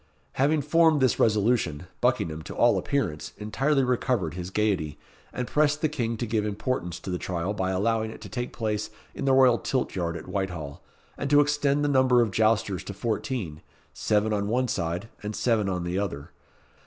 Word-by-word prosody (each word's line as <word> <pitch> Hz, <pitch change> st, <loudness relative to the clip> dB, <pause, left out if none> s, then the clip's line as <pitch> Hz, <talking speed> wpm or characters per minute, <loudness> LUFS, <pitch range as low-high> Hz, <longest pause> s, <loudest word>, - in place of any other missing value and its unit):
Having 145 Hz, +2 st, +2 dB
formed 160 Hz, +1 st, +4 dB
this 130 Hz, -2 st, +2 dB
resolution, 105 Hz, -8 st, +2 dB, 0.2 s
Buckingham, 80 Hz, -1 st, +1 dB
to -, -, -8 dB
all -, -, +4 dB
appearance, 140 Hz, -, -2 dB
entirely 135 Hz, +7 st, +1 dB
recovered 125 Hz, -, 0 dB
his 90 Hz, 0 st, -5 dB
gaiety, 95 Hz, -7 st, 0 dB, 0.3 s
and 125 Hz, -, -3 dB
pressed 150 Hz, 0 st, +2 dB
the 155 Hz, -, +2 dB
King 115 Hz, -6 st, -2 dB
to 120 Hz, -, -2 dB
give 110 Hz, -1 st, 0 dB
importance 100 Hz, -4 st, -2 dB
to 95 Hz, -, -6 dB
the 90 Hz, -, -2 dB
trial 90 Hz, +2 st, -2 dB
by 95 Hz, -3 st, -1 dB
allowing 110 Hz, +4 st, 0 dB
it -, -, -9 dB
to -, -, -8 dB
take 125 Hz, -1 st, -4 dB
place 110 Hz, -2 st, -2 dB, 0.2 s
in -, -, -4 dB
the 135 Hz, -, +4 dB
royal 130 Hz, -3 st, +5 dB
tilt 130 Hz, -2 st, -1 dB
yard 85 Hz, -2 st, -2 dB
at -, -, -10 dB
Whitehall, 90 Hz, -6 st, -4 dB, 0.4 s
and 140 Hz, -, -2 dB
to 145 Hz, +1 st, +6 dB
extend 145 Hz, 0 st, +2 dB
the -, -, +2 dB
number 130 Hz, -3 st, +4 dB
of 110 Hz, -, -2 dB
jousters 110 Hz, -3 st, +1 dB
to 100 Hz, -, -6 dB
fourteen 105 Hz, -, -3 dB, 0.3 s
seven 105 Hz, +1 st, +1 dB
on 100 Hz, -1 st, 0 dB
one 125 Hz, +4 st, +1 dB
side, 85 Hz, 0 st, -2 dB
and 105 Hz, 0 st, -4 dB
seven 110 Hz, -5 st, +1 dB
on 90 Hz, -2 st, -2 dB
the 90 Hz, +2 st, -1 dB
other. 80 Hz, -8 st, -4 dB
110 Hz, 190 wpm, -26 LUFS, 95-130 Hz, 0.4 s, to